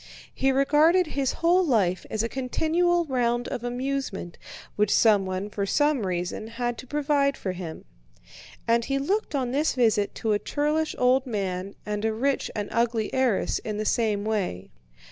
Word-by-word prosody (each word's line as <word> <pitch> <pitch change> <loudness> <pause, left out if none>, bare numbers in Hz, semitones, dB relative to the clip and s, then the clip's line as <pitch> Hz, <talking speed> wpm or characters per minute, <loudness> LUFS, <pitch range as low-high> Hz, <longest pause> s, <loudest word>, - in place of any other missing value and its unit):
He 270 0 +1
regarded 300 +7 +4
his 280 -4 -1
whole 360 +2 +5
life 205 - +1
as 220 0 -1
a - - 0
continual 330 +8 +1
round 245 -3 0
of 240 - -4
amusement 245 -7 -3 0.4
which 210 -1 +2
someone 195 -3 +3
for 200 -1 -2
some 290 -4 +2
reason 180 +4 -3
had 240 +1 -3
to 260 - -9
provide 285 0 +1
for 190 - -3
him. 175 -3 -7 0.8
And 230 0 +3
he 275 - 0
looked 370 +5 -1
on 255 -3 -1
this 295 +3 +1
visit 220 -5 +2
to 220 - -1
a 205 - +1
churlish 300 +4 -1
old 255 +2 +3
man 195 -3 -3
and 210 0 -3
a 220 0 +1
rich 270 +5 0
and 205 -1 -2
ugly 230 -1 0
heiress 255 -6 +1
in 215 -1 -5
the 215 - -2
same 210 -2 +1
way. 195 - -2
240 Hz, 165 wpm, -26 LUFS, 210-280 Hz, 0.8 s, whole